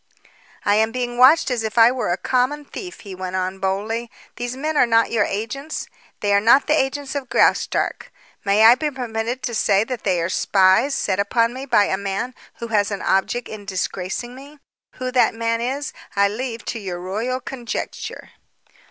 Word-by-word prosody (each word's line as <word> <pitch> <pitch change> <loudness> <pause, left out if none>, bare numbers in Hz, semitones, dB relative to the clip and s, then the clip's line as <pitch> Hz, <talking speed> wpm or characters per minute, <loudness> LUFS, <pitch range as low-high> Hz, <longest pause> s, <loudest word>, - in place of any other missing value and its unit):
"I 205 +1 +4
am 220 +1 +2
being 245 0 -3
watched 265 +3 +6
as 245 -2 0
if 220 +1 -4
I 230 +1 +7
were 250 -8 -2
a 175 - 0
common 260 +6 0
thief," 360 +5 -8
he 200 -3 -9
went 185 0 -5
on 185 +1 -2
boldly. 215 +5 -2 0.3
"These 245 +1 -4
men 305 +3 -2
are 250 - +4
not 230 0 +3
your 220 -3 +2
agents; 250 +9 -4 0.4
they 205 -1 +1
are 200 - +5
not 235 +6 +5
the 300 - +2
agents 275 -1 -1
of 275 -3 -4
Graustark. - - +1 0.3
May 205 +2 +4
I 230 - +10
be 300 +4 -1
permitted 240 -2 -4
to 240 - -3
say 205 -2 +3
that 245 0 -5
they 185 -3 +1
are 170 - 0
spies 190 +8 +3
set 190 -1 -1
upon 230 +3 +1
me 265 +2 -7
by 210 - +4
a 190 - 0
man 200 +5 -3 0.2
who 235 - -7
has 205 -2 +2
an 200 -2 -4
object 210 +5 0
in 215 -1 -8
disgracing 195 +4 -4
me? 280 +3 -13 0.4
Who 255 0 -4
that 250 -3 +3
man 230 0 -1
is, 270 +4 -3 0.2
I 200 0 +4
leave 230 +2 -5
to 230 - -4
your 185 -4 -5
royal 215 +8 -3
conjecture." 245 -2 -6
230 Hz, 195 wpm, -21 LUFS, 200-255 Hz, 0.4 s, I